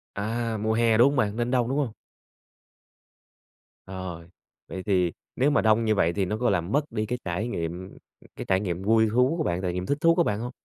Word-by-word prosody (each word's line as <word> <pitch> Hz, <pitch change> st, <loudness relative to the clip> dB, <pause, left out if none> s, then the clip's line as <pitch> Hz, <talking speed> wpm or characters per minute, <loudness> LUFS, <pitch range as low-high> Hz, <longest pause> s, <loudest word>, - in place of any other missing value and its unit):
À, 115 Hz, +2 st, -2 dB
mùa 110 Hz, +1 st, 0 dB
hè, 115 Hz, -1 st, +3 dB
đúng 120 Hz, +4 st, +6 dB
hông 145 Hz, -, -2 dB
bạn? 105 Hz, -5 st, +1 dB
Nên 120 Hz, +1 st, -1 dB
đông, 125 Hz, -2 st, +1 dB
đúng 135 Hz, -, -1 dB
hông? 140 Hz, -6 st, 0 dB, 2.0 s
Rồi, 95 Hz, -3 st, -7 dB, 0.4 s
vậy 95 Hz, -, -6 dB
thì 90 Hz, -4 st, +1 dB, 0.2 s
nếu 135 Hz, +3 st, +2 dB
mà 140 Hz, -, +3 dB
đông 110 Hz, +1 st, +3 dB
như 110 Hz, -, +2 dB
vậy 85 Hz, -3 st, +2 dB
thì 100 Hz, -2 st, 0 dB
nó 105 Hz, +4 st, -2 dB
có 120 Hz, +2 st, +1 dB
làm 90 Hz, 0 st, -1 dB
mất 145 Hz, +1 st, 0 dB
đi 110 Hz, -1 st, -2 dB
cái 125 Hz, +3 st, -3 dB
trải 90 Hz, +5 st, -2 dB
nghiệm 90 Hz, -3 st, -4 dB
ừm, -, -, -16 dB, 0.4 s
cái -, -, -6 dB
trải 95 Hz, -1 st, +2 dB
nghiệm 90 Hz, -2 st, -3 dB
vui 110 Hz, +1 st, +3 dB
thú 125 Hz, +8 st, +2 dB
của 160 Hz, -, 0 dB
bạn, 85 Hz, -, -1 dB
trải 90 Hz, -2 st, -2 dB
nghiệm 90 Hz, +1 st, -3 dB
thích 145 Hz, -, 0 dB
thú 165 Hz, 0 st, +5 dB
của 175 Hz, -, +3 dB
bạn 105 Hz, -8 st, -1 dB
hông? 120 Hz, +2 st, -5 dB
110 Hz, 235 wpm, -26 LUFS, 95-120 Hz, 2.0 s, đúng